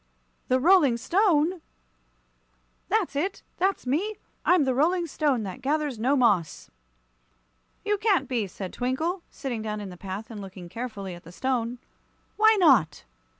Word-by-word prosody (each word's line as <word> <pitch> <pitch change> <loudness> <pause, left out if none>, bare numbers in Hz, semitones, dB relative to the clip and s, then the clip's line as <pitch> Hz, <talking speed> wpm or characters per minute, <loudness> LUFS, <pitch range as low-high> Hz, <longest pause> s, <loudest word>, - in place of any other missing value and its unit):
"The 255 - +3
Rolling 300 -5 +5
Stone!" 350 - +2 1.3
"That's - - 0
it. 365 +8 -2
That's 385 -3 0
me. 355 +12 -1 0.3
I'm 360 -4 +4
the 260 -1 +1
Rolling 340 +7 +2
Stone 285 -6 0
that 190 -3 -7
gathers 290 -3 -1
no 260 +5 +2
moss." 205 - +1 1.1
"You 415 -1 +1
can't 400 -4 +2
be," 235 -6 -1
said 185 0 -7
Twinkle, 315 +9 -1
sitting 255 -6 -5
down 215 -1 -4
in 205 -2 -6
the 180 - -11
path 195 +5 -7
and 210 -2 -7
looking 185 -2 -10
carefully 200 -3 -6
at 175 - -10
the 170 - -12
stone. 245 +2 -2 0.6
"Why 435 0 +5
not?" 235 - +4
260 Hz, 150 wpm, -26 LUFS, 210-340 Hz, 1.3 s, Rolling